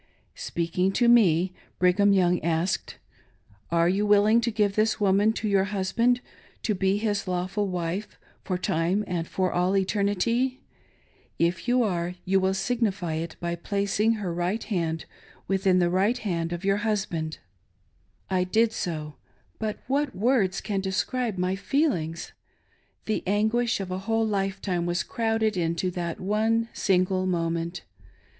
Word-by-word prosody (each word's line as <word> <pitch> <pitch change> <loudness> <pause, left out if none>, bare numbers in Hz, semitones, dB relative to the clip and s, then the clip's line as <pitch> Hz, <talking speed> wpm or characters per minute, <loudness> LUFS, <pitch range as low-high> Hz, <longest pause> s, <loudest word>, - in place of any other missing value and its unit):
Speaking 175 +3 -1
to 240 - +3
me, 185 -7 +4 0.2
Brigham 185 +3 +4
Young 180 -3 +3
asked: 170 +2 -1 0.7
"Are 170 0 +3
you 195 +4 +1
willing 210 +2 +4
to 235 - 0
give 210 -3 +1
this 215 +1 +2
woman 205 +1 +3
to 220 - -3
your 195 -2 +3
husband 220 +5 +1 0.4
to 215 - +1
be 195 0 +1
his 205 -2 -1
lawful 185 +3 -1
wife 180 +2 -3 0.3
for 185 - -2
time 180 +3 0
and 175 -3 -3
for 185 -1 -1
all 180 +2 +2
eternity? 210 +6 0 0.8
If 170 +5 0
you 245 0 +3
are 180 -4 -1
you 190 +1 +3
will 190 0 +1
signify 195 -4 -1
it 160 +1 -4
by 170 0 -2
placing 200 +4 0
her 200 -6 -3
right 175 +6 -1
hand 165 -6 -2 0.4
within 190 -1 +2
the 175 -1 +2
right 200 +7 +2
hand 170 -7 -2
of 175 +2 -4
your 195 0 +3
husband." 190 -8 -2 0.9
I 185 -1 +1
did 220 +5 +2
so; 155 -7 -4 0.4
but 215 -1 -3
what 280 +2 0
words 210 -3 +1
can 200 -1 -2
describe 205 +4 -1
my 180 +1 0
feelings! 195 - -1 0.7
The 215 - -1
anguish 220 +4 +1
of 190 -2 -5
a 185 - -2
whole 225 +3 0
lifetime 195 -4 -1
was 175 0 0
crowded 225 -2 0
into 170 +1 -1
that 170 -2 -4
one 220 +4 +1
single 185 -1 +1
moment. 170 -1 -2
195 Hz, 145 wpm, -26 LUFS, 175-215 Hz, 0.9 s, me